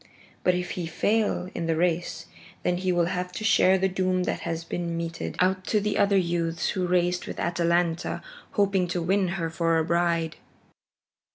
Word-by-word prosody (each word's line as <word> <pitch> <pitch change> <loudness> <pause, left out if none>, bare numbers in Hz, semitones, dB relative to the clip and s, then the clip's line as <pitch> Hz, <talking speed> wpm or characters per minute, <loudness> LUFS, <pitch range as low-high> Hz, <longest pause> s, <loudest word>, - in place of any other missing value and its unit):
But 180 - +3
if 180 0 -3
he 175 -2 -3
fail 205 +1 0
in 165 - -3
the 165 - +1
race, 175 +1 -1 0.4
then 180 0 +1
he 185 0 0
will 175 -1 +2
have 180 +1 -2
to 195 - -5
share 190 -3 +5
the 190 +1 +2
doom 185 -1 0
that - - -2
has 165 0 -3
been 170 0 -3
meted 170 0 -4
out 185 +1 +2
to 215 - +2
the 205 0 -1
other 200 0 +4
youths 170 -2 0
who 185 -2 -1
raced 180 0 +1
with - - -6
Atalanta 170 0 0 0.3
hoping 195 -3 +2
to 175 0 -2
win 190 +2 +2
her 165 -2 -2
for 165 0 +1
a 160 - +1
bride." 170 -1 +1
175 Hz, 185 wpm, -26 LUFS, 170-185 Hz, 0.4 s, share